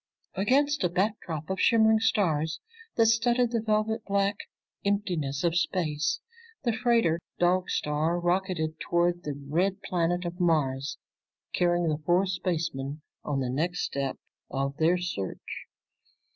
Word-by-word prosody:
Against 275 Hz, +8 st, +2 dB
a 180 Hz, -, +3 dB
backdrop 180 Hz, -4 st, -2 dB
of 190 Hz, -, -2 dB
shimmering 220 Hz, -1 st, +5 dB
stars 160 Hz, -8 st, +1 dB, 0.4 s
that 230 Hz, -, +5 dB
studded 235 Hz, +2 st, +3 dB
the 230 Hz, -2 st, 0 dB
velvet 220 Hz, 0 st, 0 dB
black 200 Hz, 0 st, +1 dB, 0.5 s
emptiness 175 Hz, -9 st, -1 dB
of 170 Hz, -1 st, +2 dB
space, 155 Hz, -4 st, 0 dB, 0.4 s
the 235 Hz, -3 st, +1 dB
freighter 225 Hz, -7 st, +2 dB, 0.2 s
Dog 180 Hz, +1 st, +2 dB
Star 155 Hz, +4 st, 0 dB
rocketed 175 Hz, -3 st, 0 dB
toward 175 Hz, 0 st, +1 dB
the 145 Hz, -4 st, -5 dB
red 190 Hz, +6 st, 0 dB
planet 175 Hz, -1 st, 0 dB
of 175 Hz, +1 st, -5 dB
Mars 145 Hz, -5 st, +1 dB, 0.6 s
carrying 175 Hz, -1 st, +2 dB
the 155 Hz, -1 st, -1 dB
four 175 Hz, +4 st, +3 dB
spacemen 160 Hz, -6 st, -2 dB, 0.2 s
on 140 Hz, -2 st, -1 dB
the 130 Hz, -, -1 dB
next 170 Hz, +7 st, -1 dB
step 135 Hz, -1 st, -2 dB, 0.3 s
of 135 Hz, 0 st, -2 dB
their 165 Hz, +3 st, +3 dB
search. 175 Hz, -, -5 dB
175 Hz, 130 wpm, -28 LUFS, 155-200 Hz, 0.6 s, shimmering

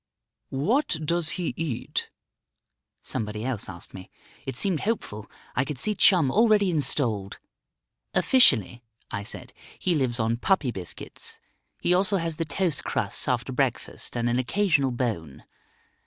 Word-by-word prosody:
"What 190 Hz, -, +1 dB
does 170 Hz, 0 st, +2 dB
he 175 Hz, -2 st, -2 dB
eat?" 155 Hz, -8 st, -3 dB, 0.9 s
somebody 105 Hz, 0 st, -3 dB
else 125 Hz, -6 st, -2 dB
asked 85 Hz, -2 st, -9 dB
me. 95 Hz, 0 st, -10 dB, 0.4 s
It 135 Hz, -, -3 dB
seemed 175 Hz, +4 st, +1 dB
hopeful; 125 Hz, -, -3 dB, 0.3 s
I 125 Hz, -, +2 dB
could 140 Hz, 0 st, -5 dB
see 210 Hz, +12 st, 0 dB
Chum 175 Hz, -9 st, +5 dB
already 210 Hz, -, +4 dB
installed. 120 Hz, -, +1 dB, 0.8 s
"Officially," 125 Hz, -, +4 dB, 0.3 s
I 100 Hz, -, -3 dB
said, 100 Hz, -, -7 dB, 0.2 s
"he 180 Hz, -, 0 dB
lives 130 Hz, -6 st, 0 dB
on 115 Hz, +1 st, +1 dB
puppy 145 Hz, -2 st, +1 dB
biscuits; 95 Hz, -5 st, -9 dB, 0.4 s
he 175 Hz, -, +2 dB
also 190 Hz, +2 st, +3 dB
has 165 Hz, -3 st, -2 dB
the 165 Hz, -, -1 dB
toast 160 Hz, 0 st, 0 dB
crusts -, -, -1 dB
after -, -, 0 dB
breakfast -, -, -2 dB
and 120 Hz, 0 st, 0 dB
an 120 Hz, +1 st, +1 dB
occasional 165 Hz, 0 st, +2 dB
bone. 110 Hz, -, -3 dB
135 Hz, 140 wpm, -26 LUFS, 115-180 Hz, 0.9 s, Chum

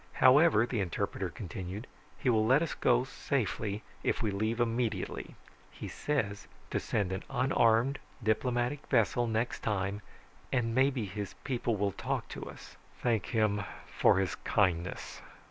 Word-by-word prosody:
"However," 130 Hz, -3 st, +6 dB
the 120 Hz, -2 st, -2 dB
interpreter 90 Hz, -3 st, -2 dB
continued, 95 Hz, +5 st, -6 dB, 0.3 s
"he -, -, -4 dB
will 110 Hz, -3 st, +4 dB
let 130 Hz, +8 st, +4 dB
us 165 Hz, -, -2 dB
go 120 Hz, 0 st, +3 dB
safely 110 Hz, -6 st, -2 dB, 0.2 s
if -, -, 0 dB
we 105 Hz, -, +1 dB
leave 110 Hz, +4 st, -1 dB
immediately. 120 Hz, -1 st, -1 dB, 0.3 s
He -, -, -8 dB
says 110 Hz, -9 st, -2 dB, 0.2 s
to -, -, +1 dB
send 100 Hz, -3 st, -1 dB
an 95 Hz, -, -2 dB
unarmed, 125 Hz, 0 st, +3 dB, 0.2 s
diplomatic 120 Hz, +5 st, 0 dB
vessel 120 Hz, -1 st, +2 dB
next 115 Hz, +2 st, -1 dB
time 100 Hz, -1 st, -1 dB, 0.5 s
and 115 Hz, -2 st, +1 dB
maybe 130 Hz, -2 st, +2 dB
his 100 Hz, 0 st, -5 dB
people 120 Hz, -4 st, 0 dB
will 100 Hz, 0 st, 0 dB
talk -, -, -3 dB
to -, -, -6 dB
us." -, -, -12 dB, 0.3 s
"Thank 115 Hz, -6 st, +1 dB
him 105 Hz, -3 st, +1 dB, 0.3 s
for -, -, +5 dB
his 95 Hz, -1 st, +1 dB
kindness." 90 Hz, -3 st, 0 dB
115 Hz, 145 wpm, -31 LUFS, 100-125 Hz, 0.5 s, However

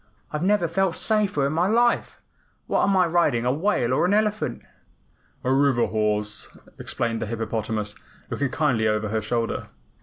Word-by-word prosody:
"I 150 Hz, -, -1 dB
never 190 Hz, +1 st, +2 dB
felt 185 Hz, +1 st, 0 dB
safer 210 Hz, -10 st, +1 dB
in 140 Hz, -, 0 dB
my 170 Hz, +3 st, +2 dB
life. 235 Hz, +3 st, +1 dB, 0.5 s
What -, -, +1 dB
am 195 Hz, -1 st, +3 dB
I 180 Hz, -, +5 dB
riding, 160 Hz, -8 st, +2 dB
a 125 Hz, -, +3 dB
whale 145 Hz, -, +1 dB
or -, -, +2 dB
an 185 Hz, +3 st, +3 dB
elephant?" 210 Hz, -, 0 dB, 0.8 s
"A 130 Hz, -, +2 dB
river 135 Hz, -3 st, +3 dB
horse," 105 Hz, -1 st, -2 dB, 0.3 s
explained 115 Hz, -1 st, -2 dB
the 110 Hz, -, -2 dB
hippopotamus, 110 Hz, -1 st, -3 dB, 0.4 s
looking 140 Hz, -1 st, -1 dB
kindly 125 Hz, -6 st, +1 dB
over 105 Hz, 0 st, 0 dB
her 110 Hz, +1 st, -1 dB
shoulder. 115 Hz, +2 st, -2 dB
135 Hz, 160 wpm, -24 LUFS, 110-180 Hz, 0.8 s, I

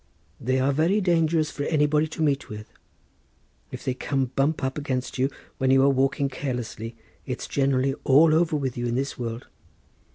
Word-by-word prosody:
They 130 Hz, +2 st, 0 dB
are 135 Hz, +2 st, +2 dB
very 165 Hz, +9 st, +2 dB
dangerous 165 Hz, -4 st, +2 dB
for 145 Hz, -, -6 dB
anybody 150 Hz, 0 st, +2 dB
to 160 Hz, +1 st, -4 dB
meet 140 Hz, -2 st, 0 dB
with. 105 Hz, 0 st, -9 dB, 1.0 s
If -, -, -8 dB
they 130 Hz, -, 0 dB
come 135 Hz, -1 st, -2 dB
bump 145 Hz, +2 st, +1 dB
up 130 Hz, 0 st, -1 dB
against 130 Hz, -3 st, -3 dB
you 135 Hz, +1 st, +2 dB, 0.3 s
when 130 Hz, -1 st, +1 dB
you 135 Hz, 0 st, +5 dB
are 140 Hz, -, +5 dB
walking 135 Hz, +1 st, +1 dB
carelessly 125 Hz, -4 st, -5 dB, 0.3 s
it's 125 Hz, -1 st, -4 dB
generally 135 Hz, -1 st, +1 dB
all 155 Hz, +4 st, +6 dB
over 160 Hz, -1 st, +2 dB
with 135 Hz, -4 st, -2 dB
you 120 Hz, 0 st, -2 dB
in 120 Hz, -, -1 dB
this 135 Hz, +1 st, -2 dB
world. 115 Hz, 0 st, -4 dB
135 Hz, 175 wpm, -25 LUFS, 130-150 Hz, 1.0 s, all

